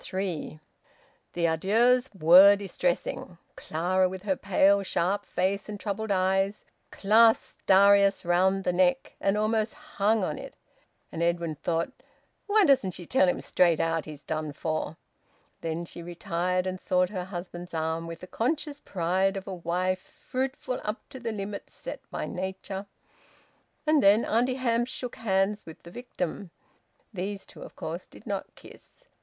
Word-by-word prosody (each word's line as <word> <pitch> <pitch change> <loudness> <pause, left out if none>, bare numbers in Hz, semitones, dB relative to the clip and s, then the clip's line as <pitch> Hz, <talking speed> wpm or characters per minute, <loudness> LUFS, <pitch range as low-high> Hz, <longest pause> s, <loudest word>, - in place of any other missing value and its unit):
THREE. 185 -5 -4 0.7
The 170 -1 0
adieux 220 +10 +3 0.2
were 185 +6 +9
distressing. - - -2 0.2
Clara, 185 +3 0
with 185 0 -7
her 195 -2 +1
pale 200 +1 +3
sharp 195 +2 -1
face 195 +3 -1
and 205 -1 -6
troubled 215 +1 -3
eyes, 195 +1 +1 0.2
clasped 225 +3 +3
Darius 200 0 +5
round 190 +3 +2
the 180 - 0
neck, 185 +8 +2
and 195 +1 +2
almost 215 0 0
hung 225 -9 0
on 155 -4 -2
it. - - -9 0.6
And 165 - -5
Edwin 170 -1 0
thought: 165 - -2 0.6
"Why 420 -1 +5
doesn't 255 - +3
she 175 - -8
tell 270 +6 +3
him 270 - -1
straight 170 -3 +3
out 165 -1 0
he's 150 -2 -9
done 155 -2 -3
for?" 155 +1 -3 0.6
Then 165 +1 -3
she 170 - -9
retired 175 +1 -2
and 185 0 -4
sought 180 0 +2
her 185 -3 -4
husband's 175 -2 -7
arm 160 +1 -2
with 165 0 -8
the - - -7
conscious 285 - -2
pride 190 - 0
of 195 - -7
a 195 - -4
wife 180 +2 -1
fruitful 255 +3 -4
up 210 +2 -2
to 260 - -9
the 230 -2 -3
limits 200 -1 -6
set - - -7
by - - -4
nature. 190 +1 -5 1.0
And 305 -1 +4
then 205 +3 +5
Auntie 245 +4 +1
Hamps 240 -2 0
shook 250 -1 -6
hands 200 -1 0
with 160 - -11
the 170 - -11
victim. 195 -5 -5 0.6
These 195 +1 -4
two - - -14
of - - -10
course - - -6
did - - -16
not - - -4
kiss. - - -16
190 Hz, 155 wpm, -27 LUFS, 175-215 Hz, 1.0 s, were